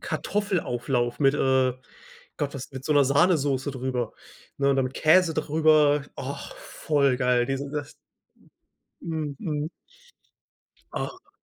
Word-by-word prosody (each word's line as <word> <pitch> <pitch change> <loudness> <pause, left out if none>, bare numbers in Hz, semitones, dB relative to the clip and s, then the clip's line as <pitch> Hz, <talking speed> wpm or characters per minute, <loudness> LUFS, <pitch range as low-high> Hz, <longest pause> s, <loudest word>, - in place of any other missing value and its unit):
Kartoffelauflauf 135 - -1
mit, 140 -1 +4
äh 130 -1 +2 0.6
Gott, 145 -3 -3
was 135 - -7
mit 130 0 -8
so 155 - +1
'ner 145 -1 +5
Sahnesoße 140 -2 +2
drüber, 125 -3 -3 0.5
ne, 140 0 +3
oder 135 -1 +2
mit 130 - -5
Käse 160 +1 +4
drüber. 155 -2 +3
Ach, 140 +1 -6
voll 140 -4 0
geil. 125 -1 +2
Diese 135 +1 -3
das 145 0 -5 1.1
Mhm. 150 -1 -3 1.2
Ach. - - -6
140 Hz, 115 wpm, -26 LUFS, 130-155 Hz, 1.2 s, ner